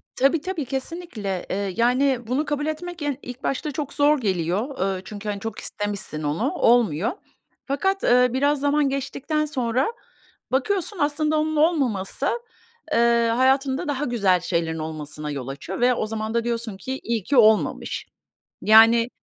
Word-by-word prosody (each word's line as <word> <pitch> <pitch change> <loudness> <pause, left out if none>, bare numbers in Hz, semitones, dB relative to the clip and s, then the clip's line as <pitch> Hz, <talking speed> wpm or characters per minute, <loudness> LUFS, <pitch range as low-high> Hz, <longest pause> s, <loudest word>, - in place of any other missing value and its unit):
Tabii 275 +4 +3
tabii, 340 -5 -3
kesinlikle. 260 - -4
Eee, 195 -1 -2
yani, 250 +1 +2
bunu 270 +6 0
kabul 295 0 -2
etmek 340 +2 -5
en 290 -3 -1
ilk 250 +1 -9
başta 275 +3 -1
yani 290 - -6
çok 285 -1 -4
zor 295 +1 +4
geliyor. 195 - -1
Eee, 185 - -8
çünkü, 210 0 -6
hani, 200 -1 -3
çok 225 +1 -5
istemişsin 200 -7 -4
onu, 150 +2 0
olmuyor. 225 -5 +3 0.5
Fakat, 385 +8 0
eee, 250 +1 +5
biraz 285 +2 +2
zaman 285 0 +2
geçtikten 275 +3 -2
sonra 260 -2 0 0.6
bakıyorsun 380 +9 0
aslında 300 +1 +1
onun 310 0 -1
olmaması, 275 - +1 0.7
eee, 235 0 +4
hayatında 265 +2 +2
daha 290 0 -1
güzel 200 -8 +2
şeylerin 165 -2 -1
olmasına 150 -1 -5
yol 135 -3 -5
açıyor 140 +9 -6
ve 250 +1 +5
o 235 - -1
zaman 220 0 -4
da 235 0 +1
diyorsun 230 -3 -3
ki 260 +7 -5
iyi 230 -4 -1
ki 280 - 0
olmamış. 220 -2 +3 0.6
Yani 230 +2 +6
245 Hz, 155 wpm, -23 LUFS, 205-290 Hz, 0.7 s, Yani